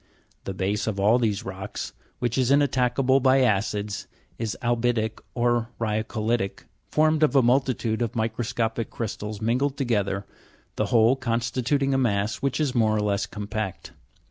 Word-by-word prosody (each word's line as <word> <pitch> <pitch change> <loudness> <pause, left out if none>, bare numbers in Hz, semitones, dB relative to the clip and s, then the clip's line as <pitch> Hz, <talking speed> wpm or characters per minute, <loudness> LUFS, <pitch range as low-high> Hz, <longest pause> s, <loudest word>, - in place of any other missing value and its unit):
The 95 - -4
base 100 +4 -1
of 105 -2 -2
all 110 +5 +4
these 105 -4 0
rocks, 95 +1 -6 0.2
which 120 -2 -1
is 130 -2 +2
inattackable 135 -1 +3
by 130 +1 +4
acids, 105 -2 0 0.3
is 110 -3 -3
albi'tic 120 -2 0
or 120 -1 +1
ryacoli'tic, 110 -1 -1 0.2
formed 155 0 +3
of 150 -2 +3
a 135 - +6
multitude 120 -2 +1
of 115 - -1
microscopic 115 0 -1
crystals 105 -2 -5
mingled 130 +5 +1
together, 100 -7 0 0.5
the - - 0
whole 115 +2 +4
constituting 130 +2 0
a 135 - +2
mass 105 -3 0
which 135 +2 -1
is 145 -4 +1
more 110 -3 +3
or - - +1
less 100 -1 0
compact. 105 -1 -5
115 Hz, 145 wpm, -25 LUFS, 105-130 Hz, 0.5 s, a